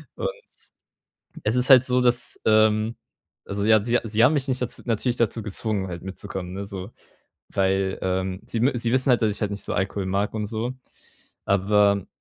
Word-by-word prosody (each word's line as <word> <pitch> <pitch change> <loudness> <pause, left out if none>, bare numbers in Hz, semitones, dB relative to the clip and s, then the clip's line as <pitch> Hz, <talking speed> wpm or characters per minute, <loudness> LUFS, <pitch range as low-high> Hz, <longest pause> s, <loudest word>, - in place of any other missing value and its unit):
Und, - - -2 1.1
es 105 +3 0
ist 125 +2 +1
halt 130 -2 +8
so, 125 0 +2
dass, 120 0 +2
ähm 110 +1 +3 0.5
also 100 0 -3
ja, 110 -1 +5
sie 120 0 +2
sie 110 +1 +1
haben 135 - +5
mich 140 -2 0
nicht 130 -1 -1
daz 125 -1 -5
natürlich 120 +1 0
dazu 115 0 0
gezwungen, 105 -1 -2
halt 85 -2 -7
mitzukommen, 95 -1 -7
ne, 100 +1 -5
so, 100 +1 -7 0.6
weil, 95 0 0
ähm, 95 0 -2
sie 115 - -3
mü 130 +4 +3
sie 115 0 0
wissen 130 +1 +2
halt, 125 - +3
dass 110 - +2
ich 100 - -7
halt 105 - 0
nicht 100 - -5
so - - -3
Alkohol 95 0 -2
mag 100 +2 -1
und 105 -1 -2
so. 115 +3 -3 0.7
Aber, 100 0 +2
105 Hz, 190 wpm, -24 LUFS, 100-120 Hz, 1.1 s, halt